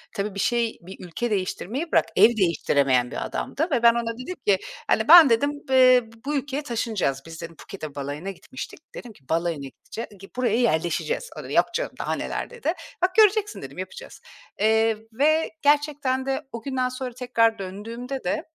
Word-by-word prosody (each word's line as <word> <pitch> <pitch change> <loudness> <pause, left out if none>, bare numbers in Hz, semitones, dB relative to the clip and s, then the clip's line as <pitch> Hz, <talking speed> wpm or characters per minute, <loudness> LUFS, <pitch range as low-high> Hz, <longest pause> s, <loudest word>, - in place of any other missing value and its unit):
tabii 200 0 -3
bir - - -4
şey, 235 0 0
bir 185 +1 -10
ülke 230 +7 -3
değiştirmeyi 215 - -2
bırak, - - +4
ev - - +8
değiştiremeyen 140 -8 +2
bir - - -3
adamdı 320 +5 -2
ve 240 -3 +1
ben 235 0 +8
ona 235 -1 -2
dedim 360 +9 -6
ki, 195 -2 +5 0.3
hani, 220 - +2
“Ben,” 330 -4 +10
dedim, 285 +6 +3 0.2
eee, 255 -1 +6 0.2
“bu 295 +1 -1
ülkeye 280 +1 -2
taşınacağız 220 - -1
biz,” 165 -1 -9
dedim. 165 0 -8
Phuket'e 155 -5 -9
balayına 145 +7 -4
gitmiştik. 255 +7 -8 0.3
Dedim 240 -2 -9
ki, 135 -9 -25
“Balayına 165 -4 -1
gidece 225 - -8 0.3
buraya 240 -3 +1
yerleşeceğiz.” 235 - 0
O - - -7
da, - - -9
“Yok - - +4
canım, - - -1
daha - - -1
neler,” - - -4
dedi. 470 -9 -2 0.3
“Bak, 370 +1 +1
göreceksin,” 420 -1 +4
dedim. - - -9
“Yapacağız.” 480 0 -8 0.4
Eee, 220 +1 +3 0.2
ve 310 +6 +2
gerçekten 285 -3 +1
de 270 +2 -1
o 230 - -6
günden 260 -2 -1
sonra 255 -1 -5
tekrar 230 -3 +1
döndüğümde 230 +8 -6
de, 305 +4 -1
235 Hz, 180 wpm, -24 LUFS, 195-275 Hz, 0.4 s, Ben